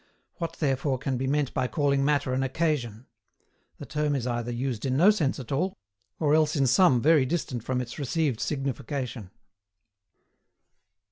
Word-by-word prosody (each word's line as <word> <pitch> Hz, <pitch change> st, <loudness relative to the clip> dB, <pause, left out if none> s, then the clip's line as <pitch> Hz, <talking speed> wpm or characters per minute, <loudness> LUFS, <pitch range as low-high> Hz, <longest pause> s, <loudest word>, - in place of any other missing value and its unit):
What 165 Hz, -2 st, -4 dB
therefore 135 Hz, -3 st, 0 dB
can 135 Hz, +1 st, -2 dB
be 130 Hz, +1 st, -2 dB
meant 145 Hz, -1 st, 0 dB
by 130 Hz, -, 0 dB
calling 140 Hz, -1 st, +1 dB
matter 140 Hz, -3 st, +1 dB
an 130 Hz, -, 0 dB
occasion? 130 Hz, -5 st, -1 dB, 0.7 s
The -, -, -8 dB
term 150 Hz, -1 st, -1 dB
is 130 Hz, -4 st, -2 dB
either 120 Hz, -1 st, -2 dB
used 120 Hz, -2 st, -3 dB
in 130 Hz, -1 st, 0 dB
no 185 Hz, +7 st, +7 dB
sense 155 Hz, -12 st, -1 dB
at 125 Hz, -, -8 dB
all, 180 Hz, +8 st, -1 dB, 0.4 s
or 150 Hz, -2 st, +2 dB
else 155 Hz, 0 st, +3 dB
in 140 Hz, -2 st, +2 dB
some 130 Hz, -2 st, +4 dB
very 155 Hz, -2 st, +5 dB
distant 130 Hz, -5 st, -2 dB
from 125 Hz, 0 st, -1 dB
its 120 Hz, +4 st, -7 dB
received 140 Hz, -3 st, 0 dB
signification. 135 Hz, -6 st, -3 dB
135 Hz, 160 wpm, -27 LUFS, 125-150 Hz, 0.7 s, no